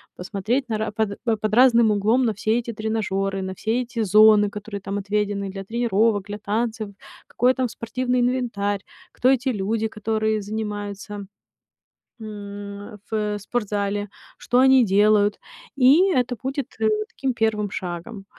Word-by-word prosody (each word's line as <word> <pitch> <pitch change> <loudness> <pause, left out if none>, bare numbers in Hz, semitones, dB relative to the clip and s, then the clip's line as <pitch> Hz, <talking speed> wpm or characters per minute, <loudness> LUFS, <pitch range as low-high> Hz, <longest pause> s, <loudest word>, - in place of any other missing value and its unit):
посмотреть 215 +8 -2
на 220 - 0
ра 215 0 -2
под, 210 -1 -2
э, 230 -2 +2
под 215 0 -2
разным 235 -2 +6
углом 215 +5 +2
на 225 - +1
все 215 +2 0
эти 235 0 -5
тренажёры, 195 -3 -2
на 190 0 -4
все 225 +6 -1
эти 235 -1 -6
зоны, 210 +1 +6
которые 205 0 -7
там 195 +1 -4
отведены 205 0 -1
для 195 0 -7
тренировок, 225 -2 +1
для 205 0 -6
танцев, 220 +1 -2 0.4
какой 250 +2 +2
там 260 -1 -1
спортивный 250 +2 -2
инвентарь, 235 -5 0 0.3
кто 255 - +2
эти 265 0 +2
люди, 220 0 -1
которые 220 0 -1
занимаются, 205 -1 -5 1.0
м, 205 0 -8
в 210 -1 -1
спортзале, 205 -1 -2 0.3
что 245 - +1
они 265 -1 +6
делают? 205 0 +3 0.4
И 285 +9 +5
это 250 -3 0
будет, 270 0 -3
э, 220 - +3 0.2
таким 270 -1 -2
первым 215 -3 0
шагом. 185 +3 -6
215 Hz, 145 wpm, -23 LUFS, 205-235 Hz, 1.0 s, разным